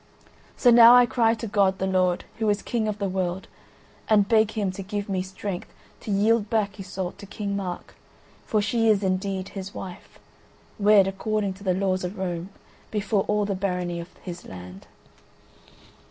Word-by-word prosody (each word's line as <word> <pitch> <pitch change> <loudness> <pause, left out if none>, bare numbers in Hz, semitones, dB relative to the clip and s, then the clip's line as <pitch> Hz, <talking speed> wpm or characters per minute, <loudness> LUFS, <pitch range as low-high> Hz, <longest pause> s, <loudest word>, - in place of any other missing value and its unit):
So 245 - +5
now 235 +1 +9
I 245 0 +7
cry 230 -1 +2
to 230 - -6
God 200 -3 +2
the 190 - -1
Lord, 185 -2 +1
who 220 -1 +1
is 205 0 0
King 230 -3 -1
of 210 -1 -2
the 200 -1 -2
world, 185 0 -2 0.6
and 205 -2 +4
beg 220 -1 +4
Him 205 -4 -1
to 185 - -7
give 200 +1 -4
me 190 -2 -1
strength 190 0 -6 0.3
to - - -9
yield 210 +2 +2
back 215 -2 -1
Iseult 190 -1 -5
to 200 - -10
King 200 0 -4
Mark; 185 -3 -5 0.5
for 215 -2 0
she 225 +2 +2
is 205 -2 +3
indeed 190 0 -1
his 195 0 -8
wife, 185 -2 -9 0.6
wed 205 -1 +6
according 200 +1 -1
to 195 +2 -14
the 185 -2 +1
laws 185 -1 0
of 180 +4 -5
Rome 180 -1 -3 0.4
before 205 -1 0
all 210 0 +1
the 200 - -1
Barony 180 -2 -2
of 170 +1 -8
his 175 -1 -7
land." 90 +1 -10
200 Hz, 180 wpm, -25 LUFS, 185-210 Hz, 0.6 s, now